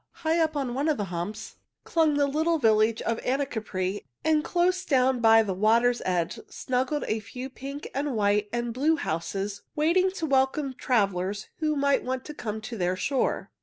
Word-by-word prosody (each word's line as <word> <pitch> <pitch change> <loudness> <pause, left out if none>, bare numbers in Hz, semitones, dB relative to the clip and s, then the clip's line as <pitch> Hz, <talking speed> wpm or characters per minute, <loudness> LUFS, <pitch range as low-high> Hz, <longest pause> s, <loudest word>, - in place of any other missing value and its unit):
High 325 +2 +3
up 315 -2 +1
on 265 -4 -2
one 280 +5 0
of 305 - +1
the 205 - -1
humps 175 +5 -5 0.3
clung 320 -3 +2
the 285 0 +3
little 315 +4 +1
village 220 -3 +3
of 230 0 -1
Anacapri, 220 -8 -2 0.2
and 310 -1 +3
close 365 +2 +1
down 260 -4 +2
by 225 -1 +6
the 195 -3 -2
water's 230 +5 +3
edge 175 -3 -1
snuggled 260 +3 -1
a 220 - 0
few 250 +5 -8
pink 275 +3 -7
and 280 -1 -2
white 205 0 +1
and 240 0 -2
blue 295 +6 +2
houses 195 - -3
waiting 340 +5 +3
to 340 -4 -3
welcome 270 0 +1
travelers 200 -5 0
who 305 -2 0
might 280 -1 +2 0.3
come 220 -4 -4
to 225 +2 -6
their 180 +1 +1
shore. 270 +8 -1
250 Hz, 170 wpm, -27 LUFS, 215-295 Hz, 0.3 s, by